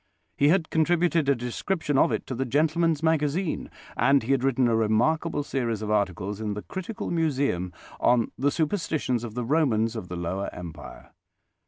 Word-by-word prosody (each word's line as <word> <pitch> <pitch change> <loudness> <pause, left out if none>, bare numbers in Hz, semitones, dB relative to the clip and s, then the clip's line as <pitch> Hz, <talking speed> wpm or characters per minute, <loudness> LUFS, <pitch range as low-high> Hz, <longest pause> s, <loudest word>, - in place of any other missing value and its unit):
He 145 - +3
had 165 0 +2
contributed 165 -1 +2
a 140 - +4
description 145 +6 -2
of 135 - +4
it - - -2
to - - -5
the 130 +2 -1
Gentleman's 155 +4 +1
Magazine, 160 +2 0 0.3
and 135 +1 +3
he 120 - -2
had 135 -2 +2
written 130 -2 +2
a 115 - +2
remarkable 135 +9 +1
series 115 -6 -2
of 105 - -2
articles 100 0 -1
in 105 -2 -2
the 105 - -6
Critical 190 +4 -5
Museum 140 - 0 0.3
on 120 -2 +3
the 140 +3 +1
superstitions 155 - -1
of 115 -2 -7
the 125 -1 -2
Romans 120 -6 +2
of 110 -5 -5
the 90 - -6
Lower 90 +3 -3
Empire. 85 -3 -10
135 Hz, 175 wpm, -26 LUFS, 110-160 Hz, 0.3 s, a